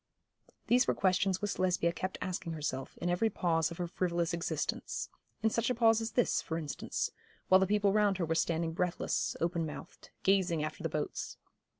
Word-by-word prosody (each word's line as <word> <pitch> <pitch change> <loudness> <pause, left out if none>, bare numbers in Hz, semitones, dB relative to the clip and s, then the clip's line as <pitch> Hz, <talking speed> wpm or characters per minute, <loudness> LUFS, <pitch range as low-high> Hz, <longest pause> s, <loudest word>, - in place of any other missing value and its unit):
These 250 +1 +4
were - - +2
questions 190 0 +2
which 205 - -2
Lesbia 180 -2 +2
kept 185 +1 -3
asking 175 -2 -3
herself, 140 -4 -4
in 175 - -3
every 175 +6 +2
pause 165 -5 +1
of 170 - -8
her 175 - -1
frivolous 170 -1 -1
existence; 170 +1 -2 0.3
in 220 - +3
such 230 +2 +1
a 250 - +1
pause 225 -1 +4
as 225 0 -4
this, 245 - +2
for 160 - -3
instance, 150 -3 -3 0.4
while 185 - +8
the 190 - +2
people 205 0 +3
round 205 -2 +3
her 175 - 0
were 165 - 0
standing 165 0 0
breathless, 180 +1 -1
open 170 0 0
mouthed, 155 -2 -8
gazing 185 -5 +3
after 155 - -4
the - - -1
boats. - - -3
180 Hz, 190 wpm, -32 LUFS, 165-200 Hz, 0.4 s, while